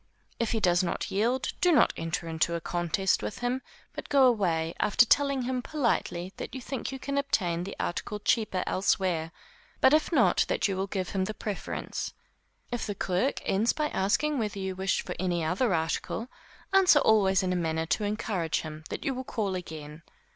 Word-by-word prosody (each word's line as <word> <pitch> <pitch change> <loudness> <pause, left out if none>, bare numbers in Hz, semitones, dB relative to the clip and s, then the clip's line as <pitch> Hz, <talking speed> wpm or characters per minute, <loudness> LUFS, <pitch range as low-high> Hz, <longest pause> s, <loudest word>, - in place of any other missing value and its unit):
If 230 -2 0
he 225 - +1
does 175 -4 +3
not 180 - -2
yield, 240 +6 +1
do 360 - +5
not 310 - +5
enter 165 +1 -3
into 165 +1 0
a - - -1
contest 175 +3 0
with - - -4
him, 245 +2 -1 0.3
but - - -7
go 275 -2 +5
away, 170 -9 +2
after 210 +4 +4
telling 280 +1 +3
him 255 0 -1
politely 225 - -1
that - - -6
you - - -4
think 260 +1 -4
you 265 - -5
can 280 +1 -2
obtain 175 -11 0
the 195 - -6
article 205 +4 -3
cheaper 205 -3 +1
elsewhere, 185 -4 0 0.5
but 265 - +5
if 310 +3 +3
not, 275 -8 +4
that - - +1
you 195 - -1
will 190 +1 -2
give 190 -2 -3
him 190 -1 -1
the 215 - -5
preference. 205 -3 -4 0.6
If 240 -2 -2
the 205 - -3
clerk 190 +8 0
ends 210 +5 +2
by 305 -1 -1
asking 280 +9 +1
whether 210 -3 -2
you 190 -1 -3
wish 190 0 0
for - - -4
any 175 -2 0
other 190 +9 +1
article, 165 +8 -1 0.4
answer 380 -5 +6
always 195 -7 +4
in 185 -1 0
a - - 0
manner 160 -2 -1
to 210 - 0
encourage 205 -5 -1
him 155 0 -8
that - - -5
you 275 - +1
will 260 +1 -4
call 215 -6 -2
again. 155 -4 -7
195 Hz, 195 wpm, -28 LUFS, 175-245 Hz, 0.6 s, answer